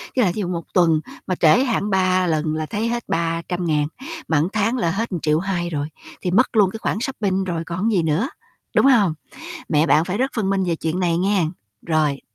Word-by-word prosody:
với 250 Hz, -, +3 dB
lại 180 Hz, -, +2 dB
ví -, -, -3 dB
dụ 190 Hz, -, -1 dB
1 170 Hz, -2 st, -3 dB
tuần 165 Hz, -4 st, +3 dB, 0.3 s
mà 185 Hz, -, 0 dB
trễ 170 Hz, +11 st, +5 dB
hạn 230 Hz, -5 st, 0 dB
3 185 Hz, -1 st, +2 dB
lần 155 Hz, -1 st, 0 dB
là 155 Hz, -, -2 dB
thấy 210 Hz, +8 st, -2 dB
hết 235 Hz, 0 st, -2 dB
300.000, 165 Hz, -2 st, -1 dB, 0.4 s
mà 160 Hz, -2 st, +2 dB
tháng 225 Hz, +4 st, +1 dB
là 170 Hz, -9 st, +1 dB
hết 220 Hz, +6 st, -2 dB
một 175 Hz, -, -2 dB
triệu 155 Hz, +1 st, +2 dB
hai 175 Hz, -2 st, -2 dB
rồi 145 Hz, -2 st, -2 dB, 0.3 s
thì 180 Hz, -, -1 dB
mất 240 Hz, +5 st, +2 dB
luôn 200 Hz, -3 st, +5 dB
cái 220 Hz, -, -7 dB
khoản -, -, -1 dB
shopping 205 Hz, -7 st, -1 dB
rồi 170 Hz, -3 st, -3 dB
còn 170 Hz, +1 st, -5 dB
cái 215 Hz, -, +2 dB
gì 170 Hz, -, +2 dB
nữa, 160 Hz, -, 0 dB, 0.5 s
đúng -, -, +5 dB
hông? 215 Hz, -, +5 dB, 0.6 s
Mẹ 155 Hz, 0 st, +3 dB
bạn 155 Hz, 0 st, +4 dB
phải 185 Hz, +3 st, -3 dB
rất 265 Hz, +2 st, +1 dB
phân 200 Hz, -4 st, 0 dB
minh 195 Hz, -1 st, +1 dB
về 170 Hz, -2 st, 0 dB
chuyện 165 Hz, +3 st, -2 dB
này 170 Hz, -2 st, +1 dB
nghe, 190 Hz, -2 st, +2 dB, 0.4 s
rồi. 155 Hz, -4 st, +1 dB
180 Hz, 230 wpm, -21 LUFS, 165-205 Hz, 0.6 s, trễ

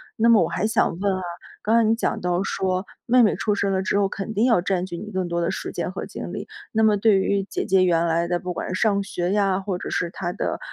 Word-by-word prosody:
那 230 Hz, -, +2 dB
么 230 Hz, -3 st, +6 dB
我 -, -, +1 dB
还 -, -, -1 dB
想 215 Hz, -6 st, +1 dB
问 200 Hz, -1 st, +1 dB
啊， -, -, -5 dB, 0.4 s
刚 220 Hz, +2 st, +2 dB
才 230 Hz, -, +5 dB
你 225 Hz, -, +4 dB
讲 225 Hz, -, -1 dB
到 180 Hz, +1 st, 0 dB
说 185 Hz, -1 st, -1 dB, 0.2 s
妹 250 Hz, +1 st, +5 dB
妹 215 Hz, -, +4 dB
出 210 Hz, -, 0 dB
生 200 Hz, -1 st, 0 dB
了 190 Hz, 0 st, 0 dB
之 200 Hz, -, +1 dB
后， 195 Hz, -, +2 dB
肯 200 Hz, +2 st, -5 dB
定 220 Hz, +2 st, +1 dB
要 235 Hz, -6 st, +4 dB
占 185 Hz, 0 st, -1 dB
据 175 Hz, -, -6 dB
你 210 Hz, +4 st, -7 dB
更 185 Hz, -2 st, -2 dB
多 170 Hz, 0 st, -1 dB
的 170 Hz, 0 st, 0 dB
时 -, -, -5 dB
间 -, -, -3 dB
和 -, -, -6 dB
精 -, -, -7 dB
力。 -, -, -5 dB, 0.2 s
那 220 Hz, -, +1 dB
么 215 Hz, -1 st, +4 dB
对 205 Hz, -1 st, +4 dB
于 200 Hz, 0 st, +1 dB
姐 -, -, -3 dB
姐 190 Hz, 0 st, +4 dB
原 170 Hz, -1 st, +2 dB
来 170 Hz, +1 st, +1 dB
的 175 Hz, 0 st, 0 dB
不 180 Hz, -, -5 dB
管 185 Hz, -, -4 dB
是 185 Hz, -, -2 dB
上 200 Hz, -3 st, +2 dB
学 180 Hz, -1 st, -2 dB
呀， 195 Hz, -2 st, +2 dB
或 195 Hz, -2 st, -3 dB
者 -, -, -6 dB
是 175 Hz, -, -1 dB
她 175 Hz, 0 st, -4 dB
的， -, -, -3 dB
195 Hz, 300 characters per minute, -23 LUFS, 180-210 Hz, 0.4 s, 么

